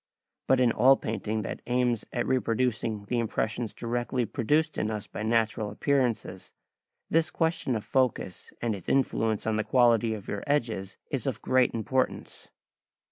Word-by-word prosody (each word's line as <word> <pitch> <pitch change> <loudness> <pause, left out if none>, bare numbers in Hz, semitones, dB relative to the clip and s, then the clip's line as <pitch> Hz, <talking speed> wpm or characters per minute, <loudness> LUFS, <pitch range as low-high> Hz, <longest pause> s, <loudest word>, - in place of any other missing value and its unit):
But 130 - +4
in 125 -2 +4
all 130 +5 +5
painting 110 -1 -3
that - - -5
aims 120 -2 +1
at - - -1
reproducing 115 -4 0
the 120 +3 -1
impressions 115 0 -2
directly 120 +1 -2
produced 150 +7 0
in 105 - 0
us 105 -2 -3
by - - -7
natural 110 -1 +1
appearances, 120 -5 -1 0.6
this 165 0 +3
question 160 -6 0
of 110 - -4
focus 125 -8 -1
and 115 -2 +1
its 100 - -6
influence 115 -5 +1
on 110 -1 +1
the 110 - +1
quality 115 -2 +3
of 105 - -10
your 100 - -4
edges 115 -9 -1
is - - -2
of - - -3
great 130 -2 +3
importance. 130 +3 -2
115 Hz, 155 wpm, -28 LUFS, 110-130 Hz, 0.6 s, all